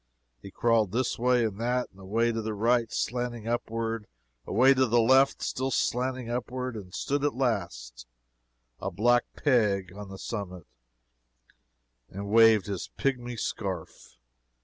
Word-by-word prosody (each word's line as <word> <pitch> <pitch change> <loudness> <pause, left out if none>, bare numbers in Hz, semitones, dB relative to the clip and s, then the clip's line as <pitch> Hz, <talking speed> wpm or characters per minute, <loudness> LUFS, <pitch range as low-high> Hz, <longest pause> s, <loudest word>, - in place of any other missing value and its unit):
He - - -9
crawled 110 -1 +2
this 125 0 -1
way 125 -1 +3
and 105 -2 -4
that 125 +2 0
away 110 +5 0
to 115 0 -2
the 110 0 -4
right, 115 +2 +2
slanting 120 -2 -3
upward 115 -2 -2 0.4
away 130 +6 +5
to 130 -1 +2
the 120 +1 +3
left, 130 +4 +4
still 130 +1 -2
slanting 130 -1 -1
upward 125 +1 -3
and 95 -4 -8
stood 140 +8 -2
at 145 - 0
last, 60 - -3 0.7
a 95 - -3
black 120 +6 +2
peg 105 - +1
on 105 -1 -8
the 95 - -8
summit, 90 -6 -6 1.4
and 100 +1 -6
waved 115 -2 +6
his 100 -3 -5
pigmy 125 -3 -1
scarf! 95 - -5
115 Hz, 140 wpm, -28 LUFS, 100-125 Hz, 1.4 s, waved